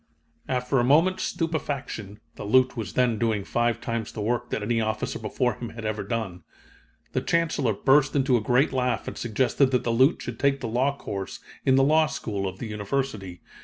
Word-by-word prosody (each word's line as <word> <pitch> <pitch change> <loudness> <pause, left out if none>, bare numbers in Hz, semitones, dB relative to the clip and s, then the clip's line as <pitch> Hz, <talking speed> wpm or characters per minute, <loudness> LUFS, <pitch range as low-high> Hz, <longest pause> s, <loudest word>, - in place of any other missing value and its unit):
"After 125 +1 +1
a - - +3
moment's 165 +9 +4
stupefaction 140 - -3
(the - - -8
Lieut. 130 +6 +3
was 110 -6 -5
then 120 -4 +2
doing 110 -4 0
five 120 +3 0
times 115 -1 -3
the - - -8
work 120 +3 -1
that 105 - -2
any 115 +1 +1
officer 110 0 -2
before 120 +3 0
him 120 +1 -7
had 115 -1 -8
ever 110 0 -2
done) 100 -4 -3 0.7
the - - 0
Chancellor 155 -8 +1
burst 135 +6 +3
into 135 -2 +3
a 120 - +2
great 125 +6 +2
laugh 125 -1 0
and - - -5
suggested 125 +3 +1
that 125 -1 +1
the 120 - 0
Lieut. 130 +7 +4
should - - -6
take 140 0 +2
the - - -4
law 130 +5 0
course 95 -6 -5 0.3
in 130 - +6
the 135 - +5
law 155 +2 +4
school 100 -9 -3
of 95 0 -6
the 120 - -6
University. 105 -4 -3
120 Hz, 200 wpm, -26 LUFS, 110-135 Hz, 0.7 s, in